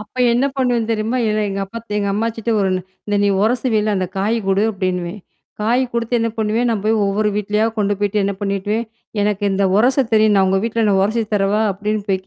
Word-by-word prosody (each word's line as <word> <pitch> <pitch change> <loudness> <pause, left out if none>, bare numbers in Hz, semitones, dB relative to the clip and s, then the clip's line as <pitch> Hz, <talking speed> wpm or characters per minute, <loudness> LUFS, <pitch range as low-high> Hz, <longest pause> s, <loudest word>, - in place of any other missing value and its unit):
அப்ப 210 +3 -13 0.2
என்ன 245 +3 +2
பண்ணுவேன் 245 -4 0
தெரியுமா? 225 +3 -1
ஏல 215 0 0
எங்க 195 0 -3
அப்பா 230 +4 -8 0.2
எங்க 200 -1 -1
அம்மாச்சிட்ட, 225 +1 -2
"ஒரு 195 - +1 0.4
இந்த 205 -1 0
நீ - - +3
உரசுவில 220 -2 +1
அந்த 185 - -1
காய் 210 +4 +1
குடு" 195 +1 +2
அப்டின்னுவேன். 185 -1 -3 0.4
காய் 240 +4 +2
குடுத்து 235 0 -2
என்ன 230 0 0
பண்ணுவேன், 220 +3 +1
நான் 215 -4 -1
போய் 220 +1 +2
ஒவ்வொரு 210 +2 +1
வீட்லயா 210 +1 +1
கொண்டு 205 0 +1
போய்ட்டு 205 0 0
என்ன 200 - 0
பண்ணிட்டுவேன், 205 +3 -1 0.4
"எனக்கு 205 0 0
இந்த 195 +1 +1
உரச 255 +5 +3
தெரியும். 215 -1 +4
நான் 190 -1 +4
உங்க 190 +1 +2
வீட்ல 230 0 0
நான் 195 -1 +3
உரசி 225 +3 0
தரவா?" 205 +1 +1
அப்டின்னு 210 +2 -2
போய் 190 -1 -1
210 Hz, 200 wpm, -19 LUFS, 200-230 Hz, 0.4 s, தெரியும்